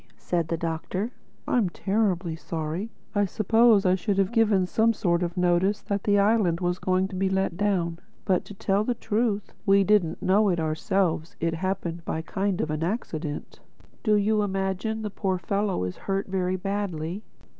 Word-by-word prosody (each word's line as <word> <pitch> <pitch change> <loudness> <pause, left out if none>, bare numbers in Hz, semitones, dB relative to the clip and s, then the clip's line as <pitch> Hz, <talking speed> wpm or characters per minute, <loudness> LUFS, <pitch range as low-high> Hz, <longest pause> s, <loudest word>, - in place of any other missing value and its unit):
said 170 -3 -1
the 165 - -1
Doctor. 170 +7 -3 0.4
"I'm 225 -7 +2
terribly 190 -3 0
sorry. 165 +5 -4 0.2
I 205 -1 +2
suppose 220 +1 +4
I 185 - +5
should 195 +1 0
have 195 +1 +2
given 215 -5 +3
some 225 +5 +2
sort 175 -5 +1
of 175 +1 -3
notice 180 +3 +2
that 200 -1 -2
the 205 -1 +4
island 200 -5 +3
was 175 0 -1
going 185 0 +1
to 195 - -7
be 190 +1 +1
let 190 -2 0
down. 175 -4 0 0.3
But, 185 -3 +2
to 205 - -10
tell 195 +1 +1
the 245 +2 -1
truth, 210 -2 -1
we 195 0 +5
didn't 195 -5 +2
know 205 +2 +3
it 175 -2 +1
ourselves; 160 +1 0
it 165 0 0
happened 175 -1 -3
by 160 - -3
a 160 - -4
kind 195 +2 -1
of 155 - -2
an 155 0 -2
accident. 160 -6 -4 0.4
Do 215 -2 +3
you 210 +1 +2
imagine 195 +2 -2
the 210 - -3
poor 190 -2 -1
fellow 200 - -1
is 90 0 -4
hurt 195 0 -2
very 185 -1 -1
badly?" 190 -2 -3
190 Hz, 180 wpm, -26 LUFS, 175-205 Hz, 0.4 s, I